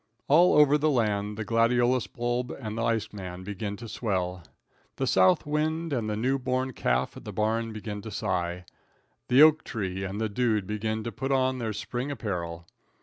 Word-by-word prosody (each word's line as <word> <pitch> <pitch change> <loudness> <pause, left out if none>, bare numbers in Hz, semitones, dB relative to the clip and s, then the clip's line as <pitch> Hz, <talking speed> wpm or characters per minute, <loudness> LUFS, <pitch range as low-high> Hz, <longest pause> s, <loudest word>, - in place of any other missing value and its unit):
All 170 +5 +6
over 150 0 +6
the 155 +2 +2
land 105 -5 0
the 110 - -3
gladiolus 120 +2 +2
bulb 120 +1 -2
and 110 -5 -6
the 115 - -2
ice 115 -2 0
man 95 -2 -7
begin 105 +1 -4
to 115 - -8
swell. 95 -5 -2 0.5
The - - -1
south 95 -1 +4
wind 155 +2 -1
and 115 -5 -1
the 105 - -1
new 130 +5 0
born 130 0 -1
calf 60 - 0
at - - -10
the - - -6
barn 115 +1 0
begin 105 -1 -6
to 110 - -7
sigh. 90 -3 -2 0.6
The 130 +4 +7
oak 155 0 +6
tree 95 -4 -4
and 100 +2 -4
the 110 - 0
dude 110 -2 0
begin 110 +2 -2
to 115 - -4
put 135 +6 -3
on 130 -1 +2
their 115 -2 -2
spring 120 +5 -4
apparel. 85 -10 -4
110 Hz, 190 wpm, -27 LUFS, 100-130 Hz, 0.6 s, The